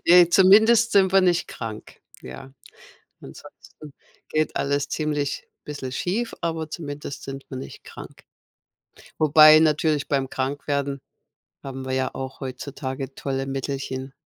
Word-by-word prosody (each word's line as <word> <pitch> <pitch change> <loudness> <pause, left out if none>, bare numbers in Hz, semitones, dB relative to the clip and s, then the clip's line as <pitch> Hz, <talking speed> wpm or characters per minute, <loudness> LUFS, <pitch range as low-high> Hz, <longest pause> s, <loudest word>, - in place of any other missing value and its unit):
Ne, 175 0 +7
zumindest 220 +5 +6
sind 190 -2 +4
wir 195 - +6
nicht 180 -2 +2
krank, 110 -1 -8 0.2
ja. 65 - -10 0.7
Ansonsten 150 -2 -14 0.4
geht 155 0 -1
alles 140 0 -1
ziemlich 150 -2 -2 0.2
bisschen 145 -3 -6
schief, 200 - -2
aber 165 -2 -3
zumindest 145 -3 -7
sind 135 0 -8
wir 130 - -6
nicht 130 - -9
krank. - - -12 0.9
Wobei 155 0 +7
natürlich 155 -1 +1
beim 135 -2 -1
Krankwerden 140 +1 -3 0.6
haben 135 -1 -7
wir 130 - -3
ja 130 0 -1
auch 130 0 -7
heutzutage 135 0 -6
tolle 135 -1 -3
Mittelchen. 135 -1 -4
145 Hz, 125 wpm, -23 LUFS, 135-160 Hz, 0.9 s, Ne